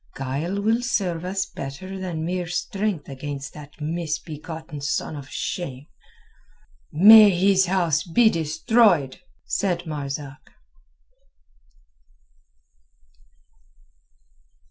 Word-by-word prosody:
Guile 140 +9 -3
will 225 +4 +1
serve 185 -9 -1
us 190 +1 -2
better 165 +8 -7
than 170 -4 -4
mere 180 0 -2
strength 190 +1 -2
against 140 +1 -6
that 150 +1 -13
misbegotten 160 0 -5
son 150 +2 -2
of 140 -2 -9
shame." 140 -6 -5 1.1
"May 210 +6 +9
his 190 +1 +3
house 170 -5 +1
be 190 +8 +3
destroyed!" 165 - +2 0.3
said 175 -3 -1
Marzak. 145 -1 -6
165 Hz, 85 wpm, -23 LUFS, 150-190 Hz, 1.1 s, May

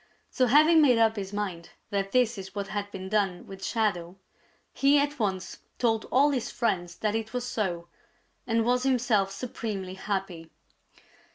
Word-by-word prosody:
So 255 - +2
having 310 +5 +6
made 255 -5 +5
up 225 -1 +3
his 195 -2 -5
mind 190 -5 -4 0.2
that 195 -1 -1
this 245 -2 +2
is 190 +1 -9
what 200 -1 -4
had 205 -1 -3
been 190 -1 -7
done 195 -3 0
with 195 0 -10
Shadow, 190 -6 -1 0.6
he 280 +1 +4
at 290 0 0
once 190 -4 -2 0.2
told 225 -3 +1
all 285 +3 +3
his 245 -4 -2
friends 175 -7 -1
that 215 -1 -1
it 225 +1 -3
was 250 -1 -2
so, 180 -8 -2 0.6
and 225 -1 +1
was 250 +1 +2
himself 245 -7 +2
supremely 200 -4 -5
happy. 190 -4 -4
210 Hz, 165 wpm, -27 LUFS, 190-245 Hz, 0.6 s, having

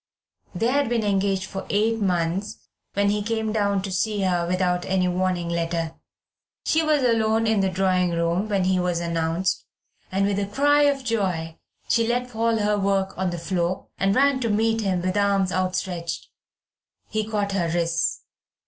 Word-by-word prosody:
They 225 +7 +1
had 280 -1 +1
been 235 -2 +1
engaged 195 -1 +1
for 195 0 -7
eight 220 +2 +1
months 185 +1 -1 0.4
when 200 0 +2
he 210 0 0
came 220 0 -1
down 200 -3 +1
to 195 - -4
see 205 +2 0
her 175 -2 +1
without 180 0 0
any 185 -1 +1
warning 180 -1 0
letter. 170 -1 -2 0.7
She 320 - +3
was 305 -3 +2
alone 225 -2 +2
in 220 -2 +2
the 195 -1 +2
drawing 185 -1 +1
room 170 +4 0
when 200 -2 +1
he 185 0 +2
was 180 -1 0
announced, 170 +1 -1 0.5
and 195 +1 +1
with 200 0 0
a 200 - -1
cry 290 +7 +3
of 275 -1 -2
joy, 185 -9 -2 0.3
she 230 -1 +2
let 245 +1 -1
fall 230 0 +1
her 210 -1 +1
work 195 -1 0
on 190 0 -1
the 175 - -4
floor, 175 +1 -2
and 195 +1 +2
ran 275 0 +3
to 235 -3 -1
meet 225 +2 +1
him 185 -4 0
with 185 0 -1
arms 200 -2 +2
outstretched. 185 -2 -2 0.8
He 215 0 -1
caught 210 -2 -2
her 180 -4 0
wrists. 170 0 0
195 Hz, 175 wpm, -24 LUFS, 180-220 Hz, 0.8 s, She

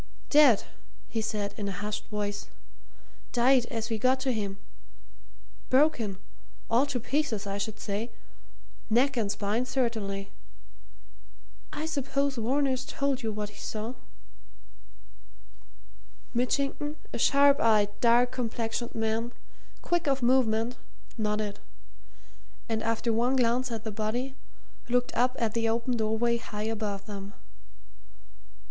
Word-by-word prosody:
"Dead!" 290 -8 +7 0.5
he 225 - -1
said 210 -2 -2
in 205 -2 -3
a - - -2
hushed 205 +2 -4
voice. 205 -1 -3 0.9
"Died 245 0 +4
as 230 -1 -3
we 220 - 0
got 260 +3 +3
to 260 -1 +1
him. 200 -4 -2 1.1
Broken 255 -8 +3 0.5
all 245 +5 +4
to 275 -3 -1
pieces, 245 -4 -1
I 200 0 -3
should 215 +1 -4
say 210 +3 -3 0.8
neck 260 +5 +3
and 215 -4 0
spine 215 +5 -1
certainly. 220 -6 -1 1.4
I 300 +1 -3
suppose 280 -3 0
Varner's 260 +2 +1
told 275 0 -1
you 225 -2 -1
what 210 -1 -3
he 205 - -14
saw." 220 +3 -4 2.4
Mitchington, 275 +4 0 0.2
a - - -3
sharp 280 0 +5
eyed, 215 -3 +4
dark 240 +1 +5
complexioned 235 -1 -3
man, 225 +2 -1 0.5
quick 345 -2 +1
of 270 -2 +1
movement, 240 -2 +3 0.4
nodded, 210 -2 -1 1.1
and 225 -1 -1
after 230 +1 0
one 240 +4 +2
glance 250 0 +2
at 225 -2 -4
the 220 - -3
body, 225 +6 -2 0.6
looked 245 0 +1
up 250 +2 +2
at 225 -2 0
the 230 -1 +1
open 235 +2 0
doorway 225 +1 +1
high 210 -2 -5
above 205 -3 -3
them. 200 -1 -7
230 Hz, 125 wpm, -29 LUFS, 215-255 Hz, 2.4 s, Dead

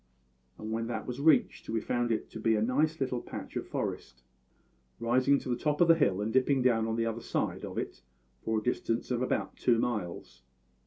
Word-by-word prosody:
And 110 0 -6
when 115 +1 -1
that 110 -2 -3
was 125 +1 -5
reached 160 +8 +3
we 115 - 0
found 120 +2 -1
it 110 - -1
to 110 - -7
be 110 0 +2
a 105 - +1
nice 150 +7 +1
little 130 -3 -1
patch - - -8
of - - -3
forest, 60 0 -4 0.8
rising 130 +4 +3
to 130 - -6
the 120 - +1
top 150 +3 -1
of 175 - +5
the 165 - +8
hill 145 - +2
and 110 +2 -2
dipping 130 0 +3
down 115 -3 +3
on 110 - -1
the 115 0 0
other 115 0 -3
side - - -2
of - - -6
it - - -4 0.4
for 110 0 0
a 110 - -2
distance 115 0 -1
of 120 -1 0
about 130 - -1
two 120 -2 +3
miles. 90 - -3
120 Hz, 215 wpm, -30 LUFS, 110-130 Hz, 0.8 s, the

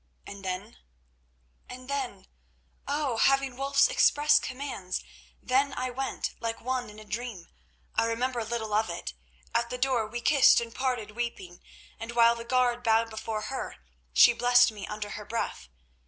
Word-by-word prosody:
"And 200 -1 -9
then?" 190 +4 -5 0.9
"And 255 0 -9
then—oh! 275 +2 -5
having 275 +1 +3
Wulf's 275 - +3
express 300 -10 +4
commands, 255 -10 -4 0.4
then 270 +2 +2
I 255 0 -2
went, 260 0 -3
like 230 0 -3
one 250 -1 -2
in 210 - -13
a 215 - -11
dream. 220 -5 -5 0.4
I 225 - +2
remember 240 +1 -1
little 220 -1 -3
of 215 -2 +2
it. 115 - -5 0.4
At 235 0 +1
the 250 - -4
door 250 -4 +1
we 235 +2 -5
kissed 275 +3 +6
and 230 -1 -6
parted 250 -5 -2
weeping, 210 -6 -5 0.4
and 230 +1 -6
while 235 0 +6
the 235 0 -7
guard 245 0 +1
bowed 225 -1 +2
before 220 0 -4
her, 265 - -4 0.4
she 155 - +7
blessed 245 0 +5
me 205 -2 -8
beneath 210 0 -5
her 210 - -6
breath. 210 - -4
235 Hz, 155 wpm, -28 LUFS, 220-255 Hz, 0.9 s, she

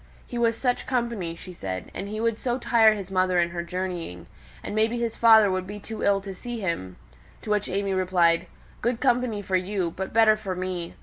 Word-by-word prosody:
"He 240 - -5
was 230 -1 +2
such 250 -1 -1
company," 235 -9 -1
she 180 +2 -10
said; 95 - -6
"and 200 - -5
he 215 +1 -4
would 230 -1 0
so 245 -1 -1
tire 225 -3 +4
his 195 -2 -7
mother 185 -1 +2
in 170 0 +1
her 170 0 -3
journeyings; 170 - -5 0.4
and - - -5
maybe 220 +2 +1
his 235 -1 -2
father 220 -3 +6
would 185 0 -2
be 205 +1 -7
too 220 +2 -7
ill 200 -1 +3
to 195 0 -7
see 240 +5 -6
him." 165 - -3 0.5
To 210 - -4
which 210 -1 +1
AimÄe 195 0 -1
replied, 180 -3 +2 0.3
"Good 235 0 0
company 245 -5 +1
for 190 0 -1
you, 185 -2 -2
but 190 0 -4
better 220 -1 +5
for 195 -3 -5
me. 180 -2 -4
200 Hz, 210 wpm, -25 LUFS, 180-225 Hz, 0.5 s, father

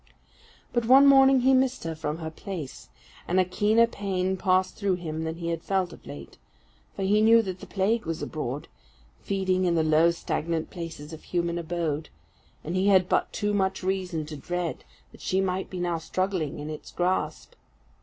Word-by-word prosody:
But 240 -2 +1
one 270 +3 +8
morning 270 -1 +7
he 265 +2 +4
missed 260 0 +2
her 165 -1 -3
from 155 -1 -4
her 160 -1 -5
place, 160 -4 -7 0.4
and 180 +2 +2
a 185 - +4
keener 210 +5 +3
pain 190 -4 -2
passed 185 0 +1
through 200 -3 0
him 160 -2 -4
than 160 0 -3
he 170 0 -4
had 165 -1 -2
felt 185 -2 -1
of - - -15
late; 70 0 -10 0.6
for - - -3
he 205 +2 +3
knew 225 +1 +6
that 185 -2 -5
the - - -10
Plague 210 +1 0
was 165 -1 -2
abroad, 145 -2 -4 0.5
feeding 190 -2 0
in 175 -1 +2
the 160 - +3
low 155 +2 +4
stagnant 165 -1 -2
places 165 -3 -7
of 160 - -9
human 170 -1 -1
abode; 165 -2 -2 0.5
and 165 +4 -4
he 190 +2 +2
had 190 -2 +5
but - - +1
too 205 0 -1
much 190 -1 0
reason 185 -4 -2
to 150 0 -7
dread 175 +3 -4 0.3
that - - -16
she 190 - 0
might 190 0 -1
be 185 - -6
now 175 -2 -1
struggling 185 -2 -2
in 145 0 -6
its 155 - -8
grasp. 180 - -1
180 Hz, 190 wpm, -26 LUFS, 165-195 Hz, 0.6 s, one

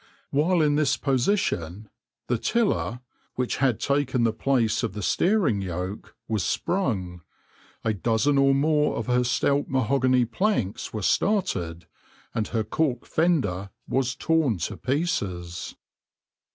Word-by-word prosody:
While 160 +4 +3
in 145 -1 +2
this 145 -3 +2
position, 120 - 0 0.4
the 120 -2 -1
tiller, 200 - 0 0.3
which 125 -1 -1
had 130 -5 +1
taken 140 -3 +1
the 115 -1 +2
place 120 -2 +1
of - - -2
the 105 -1 -5
steering 165 - +2
yoke, 90 +2 -5
was 110 -5 -1
sprung, 95 - -1 0.6
a 110 - +1
dozen 115 +7 +1
or 135 0 +4
more 150 +1 +2
of - - -3
her 125 0 +2
stout 140 +3 +1
mahogany 130 0 +2
planks 125 - -1
were 110 -2 -4
started, 90 - 0 0.5
and 110 -2 -1
her 115 -2 -1
cork 125 +3 -1
fender 115 - 0 0.2
was 130 -1 0
torn 155 - +1
to 95 +5 -3
pieces. 100 - -2
125 Hz, 130 wpm, -25 LUFS, 105-145 Hz, 0.6 s, or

